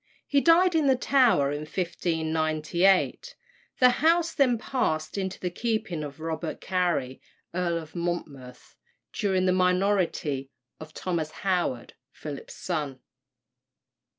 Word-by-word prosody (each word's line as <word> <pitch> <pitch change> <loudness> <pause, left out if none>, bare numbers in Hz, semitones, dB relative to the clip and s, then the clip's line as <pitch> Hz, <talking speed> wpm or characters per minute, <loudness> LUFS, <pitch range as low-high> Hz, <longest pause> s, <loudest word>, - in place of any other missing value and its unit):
He 280 -1 +2
died 350 +3 +5
in 315 -3 +2
the 265 - +5
Tower 245 - +3
in 145 - -3
1598. 160 - 0 0.4
The 250 - +7
house 330 +1 +3
then 255 -5 +3
passed 190 -11 -2
into 190 -1 -3
the 180 - -3
keeping 215 -6 -2
of 145 +1 -8
Robert 160 0 -4
Cary, 175 -9 -1 0.3
Earl 175 -1 0
of 160 0 -9
Monmouth, 150 -7 -5 0.4
during 190 -2 +1
the 185 - +3
minority 180 -7 +1 0.3
of 155 0 -11
Thomas 170 -4 -2 0.2
Howard, 175 -10 -1 0.2
Philip's 145 -2 -8
son. 150 -7 -3
175 Hz, 120 wpm, -27 LUFS, 155-210 Hz, 0.4 s, The